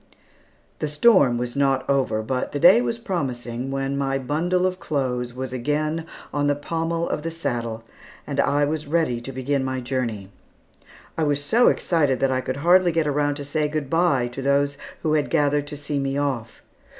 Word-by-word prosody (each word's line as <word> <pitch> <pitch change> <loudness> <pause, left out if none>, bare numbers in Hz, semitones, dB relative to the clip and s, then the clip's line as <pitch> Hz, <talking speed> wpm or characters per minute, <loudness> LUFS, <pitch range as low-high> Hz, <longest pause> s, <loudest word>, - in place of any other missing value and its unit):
The 155 - -1
storm 150 - +4
was 120 +1 -3
not 135 -2 +1
over, 130 -6 +1
but 125 +3 -2
the 145 - -1
day 190 +10 +7
was 230 -2 -1
promising, 130 - -3
when 135 0 -2
my 135 -1 0
bundle 165 +7 0
of 185 0 -1
clothes 125 -4 -2
was 130 -1 -5
again 150 +5 -1 0.3
on 145 0 +1
the 145 - +2
pommel 165 +3 -2
of - - -2
the 165 - -3
saddle, 120 -8 -3 0.4
and - - -4
I 145 +1 +3
ready 150 -4 -1
to 135 - -7
begin 135 +1 -1
my 130 0 -2
journey. 120 -6 -3 0.9
I - - +1
was 145 -1 +1
so 235 +11 +4
excited 145 -7 +2
that 135 -1 +2
I 130 0 0
could 130 +1 -4
hardly 180 0 +5
get 165 -1 +1
around 145 0 +1
to 145 -1 -6
say 150 +1 0
good 150 -2 -4
bye 165 -7 +2
to 125 +3 -7
those 140 +1 +1 0.3
who 155 - +1
had 150 -2 +1
gathered 145 0 +1
to 145 - -6
see 145 0 -3
me 135 0 -1
off. 130 -6 -3
140 Hz, 185 wpm, -23 LUFS, 130-155 Hz, 0.9 s, day